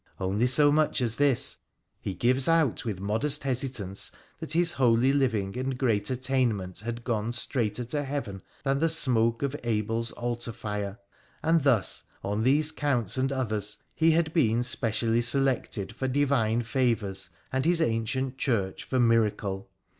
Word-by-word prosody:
Only 100 +6 0
so 145 +3 +5
much 150 0 +2
as 120 -2 +1
this: 140 -4 +2 0.4
he 95 - -5
gives 125 +7 +1
out 165 -9 +2
with 105 -5 -3
modest 115 +9 +1
hesi 130 -1 -1
tance 100 -6 -2 0.3
that 150 - -5
his 170 0 +4
holy 125 +1 +3
living 115 -9 0
and 130 0 -3
great 115 -5 0
attainment 125 -8 -1
had 115 +2 -6
gone 115 -1 -2
straighter 120 -2 -1
to 145 +5 -3
Heaven 130 -9 -5 0.2
than 135 -1 0
the 165 +2 +2
smoke 115 -6 +3
of 140 0 -1
Abel's 115 0 -1
altar 120 -1 -3
fire, 105 -2 -5 0.5
and 165 0 +3
thus, 130 -8 +1 0.2
on 105 +2 -2
these 145 +6 +5
counts 125 -9 -1
and 135 +1 0
others, 110 -6 -1 0.2
he 165 0 +3
had 160 -1 +1
been 120 -7 +2
specially 115 -1 +2
selected 125 -5 0
for 130 - -2
Divine 130 -4 +1
favours, 115 -7 -1 0.2
and 130 0 0
his 170 +1 +2
ancient 130 0 -1
Church 100 -8 -1
for 130 - -2
miracle. 105 -4 +1
120 Hz, 155 wpm, -27 LUFS, 110-135 Hz, 0.5 s, so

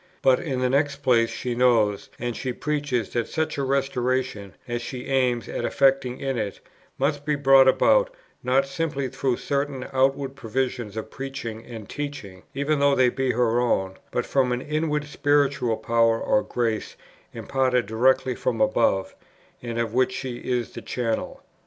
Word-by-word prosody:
But 130 -1 +5
in 135 -6 -3
the 125 - +2
next 140 0 0
place 115 -3 +4
she 125 - -3
knows 115 -5 +2
and 120 -1 -3
she 130 -2 -3
preaches 145 -6 -2
that 120 -1 0
such 160 -2 -2
a - - 0
restoration, 130 - -1
as 120 0 -3
she 125 +1 -6
aims 125 -3 +1
at - - -4
effecting 135 -2 +2
in 135 -3 -2
it, 100 -2 -4 0.4
must 145 +1 0
be 150 0 0
brought 135 -1 +6
about, - - +4 0.3
not 130 +2 +2
simply 135 -1 -2
through 130 0 -1
certain 140 -2 -2
outward 135 +1 +1
provisions 120 -3 -3
of 110 0 -5
preaching 135 -5 -6
and 110 -4 -8
teaching, 140 -11 -6
even 140 +2 0
though 140 0 +4
they 125 -1 +4
be 130 0 -1
her 120 0 +2
own, 95 -6 0
but 125 - -1
from 130 -2 +1
an 125 0 -1
inward 150 0 -1
spiritual 140 -5 +1
power 115 -1 +2
or 105 - +2
grace 115 -3 -2 0.4
imparted 130 -2 0
directly 130 +4 +2
from - - -2
above, 265 - +2 0.5
and 120 -1 -5
of 115 -2 -1
which 130 +1 +2
she 130 -2 -4
is 125 -1 -2
the - - -8
channel. 115 -3 -3
130 Hz, 165 wpm, -24 LUFS, 120-140 Hz, 0.5 s, brought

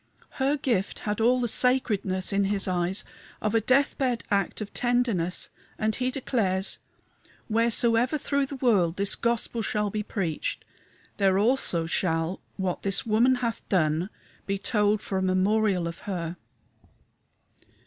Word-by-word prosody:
Her 275 +3 +2
gift 230 -9 -1
had 210 +1 -3
all 250 +3 +4
the 240 - 0
sacredness 210 -7 +2
in 200 0 +2
his 195 0 0
eyes 180 +1 -1 0.3
of 215 0 -1
a 225 - +3
death 265 +5 +2
bed 250 -4 0
act 200 -1 0
of 210 -2 -6
tenderness, 240 -8 0 0.3
and 215 -1 0
he 255 0 0
declares, 210 -8 0 0.7
"Wheresoever 230 +4 +3
through 280 -1 -1
the 280 - -6
world 205 -10 +2
this 200 0 +3
gospel 235 0 -1
shall 210 -2 -1
be 215 - -2
preached, 185 -7 -3 0.5
there 195 -2 +3
also 205 -6 +1
shall 165 +1 -1 0.2
what 190 -2 -2
this 195 -1 +1
woman 230 +4 +3
hath 230 - -2
done 165 0 +1 0.4
be 195 0 0
told 210 0 +1
for 190 - -2
a - - -2
memorial 190 0 +1
of 170 - -7
her." 175 -4 -4
210 Hz, 145 wpm, -26 LUFS, 185-240 Hz, 0.7 s, all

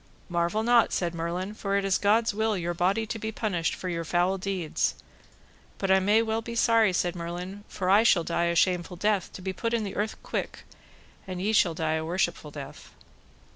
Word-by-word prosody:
Marvel 175 +5 0
not, 235 -1 +4
said 175 -2 -1
Merlin, 170 +4 -3
for 200 -2 -1
it 200 - 0
is 195 -1 +2
God's 220 +2 +3
will 220 0 0
your 175 -1 -2
body 190 +6 +1
to 225 +1 -5
be 220 +1 -3
punished 190 -7 -1
for 185 - -6
your 170 -2 -2
foul 175 +3 +1
deeds; 185 -4 -1 0.8
but 195 -1 0
I 190 - +6
may 210 +4 +3
well 220 0 -1
be 235 +1 -7
sorry, 230 -3 +4
said 175 0 0
Merlin, 180 +4 -6
for 185 - -4
I 200 +3 +6
shall 195 -7 +4
die 170 +1 0
a 170 0 0
shameful 180 0 +1
death, 205 -1 0
to 185 - -9
be 190 0 -2
put 230 +5 -1
in 225 - 0
the 200 - -5
earth 210 +1 -1
quick, - - -4 0.6
and 185 -1 -5
ye 205 +4 0
shall 175 -6 +3
die 160 -1 0
a 160 - -3
worshipful 170 -2 -1
death. 145 -2 -10
190 Hz, 210 wpm, -27 LUFS, 175-215 Hz, 0.8 s, I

